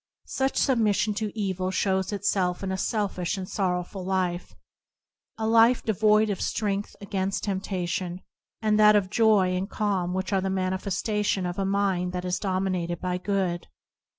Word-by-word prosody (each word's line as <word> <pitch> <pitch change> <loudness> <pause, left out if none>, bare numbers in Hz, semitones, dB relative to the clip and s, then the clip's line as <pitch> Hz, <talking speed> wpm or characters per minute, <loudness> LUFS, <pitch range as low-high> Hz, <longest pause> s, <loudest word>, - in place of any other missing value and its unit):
Such 265 0 -1
sub 265 -4 +2
mission 210 -1 +2
to 210 0 -3
evil 185 -2 -1
shows 190 0 0
itself 195 -3 0
in 190 - -2
a - - -1
selfish 200 -4 -1
and 185 -1 -5
sorrowful 185 0 -2
life; 185 -2 -2 0.8
a 220 - -2
life 230 +2 +5
alike - - -32
devoid 215 0 +3
of 195 - -4
strength 205 -2 -2
against 195 -1 -2
temptation, 185 -2 -3 0.4
and 215 0 +3
of 210 0 +7
that 185 - -14
joy 210 -5 +4
and 190 +2 -2
calm 190 -5 -1
which 190 +1 -2
are 190 - +2
the 190 - -1
manifestation 190 +1 -1
of 175 +2 -3
a 195 - 0
mind 190 -2 0
that 180 0 -3
is 180 0 -1
dominated 185 -3 -1
by 180 -1 -2
good. 185 -3 -1
190 Hz, 165 wpm, -26 LUFS, 185-210 Hz, 0.8 s, of